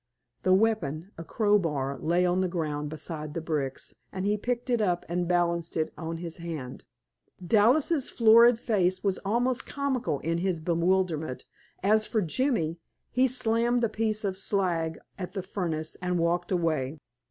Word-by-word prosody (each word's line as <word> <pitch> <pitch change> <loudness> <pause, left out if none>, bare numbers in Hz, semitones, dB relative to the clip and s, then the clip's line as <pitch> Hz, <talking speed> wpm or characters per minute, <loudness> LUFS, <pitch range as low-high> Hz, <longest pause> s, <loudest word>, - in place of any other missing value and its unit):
The 185 0 +4
weapon, 190 -5 0
a 165 - -7
crowbar, 160 - 0
lay 175 +5 +2
on 180 +1 +2
the 185 - +1
ground 150 -4 -3
beside 155 -1 -6
the - - -1
bricks, 150 -5 -3 0.2
and 185 0 -4
he 205 +1 +2
picked 245 +3 -2
it 235 -2 +2
up 180 -4 0
and 175 +1 -1
balanced 170 -1 0
it 155 - -1
on 165 0 -5
his 165 -1 -5
hand. 160 -7 -7 0.6
Dallas' 255 - +3
florid 230 +1 +6
face 185 -6 0
was 195 -2 0
almost 240 +5 0
comical 265 - -1
in 165 +1 -1
his 180 -2 -1
bewilderment; 170 -3 0 0.4
as 215 +2 +3
for 220 -3 0
Jimmy 175 - 0 0.3
he 255 +1 +3
slammed 240 -1 +2
a 230 - +2
piece 215 0 -1
of 190 -2 -1
slag 175 -6 0 0.2
at 180 - -5
the 190 -3 -3
furnace 165 -5 -3
and 180 0 0
walked 175 +2 0
away. 160 -5 0
180 Hz, 160 wpm, -28 LUFS, 165-220 Hz, 0.6 s, florid